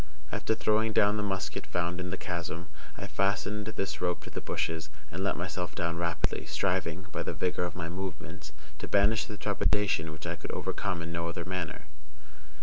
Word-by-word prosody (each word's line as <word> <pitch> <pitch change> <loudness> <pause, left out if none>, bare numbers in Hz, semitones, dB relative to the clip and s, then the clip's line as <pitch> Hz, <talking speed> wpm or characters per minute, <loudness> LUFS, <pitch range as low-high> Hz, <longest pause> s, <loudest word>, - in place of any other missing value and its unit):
After 110 - +2
throwing 110 +1 +3
down 105 0 +6
the - - +2
musket 95 -3 -1
found 90 0 0
in 90 0 -2
the 95 - -1
chasm, 85 -1 -3 0.3
I - - -4
fastened 100 +4 +1
this 95 -3 -2
rope 90 -1 +1
to - - -8
the - - -3
bushes, 80 -1 -1 0.2
and 95 +3 -2
let 100 - +2
myself 90 0 -2
down 85 -1 +1
rapidly, 85 0 +1
striving, 90 -2 +1
by - - -1
the - - -1
vigor 90 -1 +1
of 90 - -4
my 85 -2 -2
movements, 90 +1 -5 0.3
to - - -3
banish 100 +2 +5
the 105 - -6
trepidation 100 -5 +2
which 80 0 -8
I - - -1
could - - -5
overcome 90 -4 -1
in 85 - -4
no 85 0 0
other 85 0 -3
manner. 90 -2 -2
90 Hz, 190 wpm, -31 LUFS, 85-100 Hz, 0.3 s, down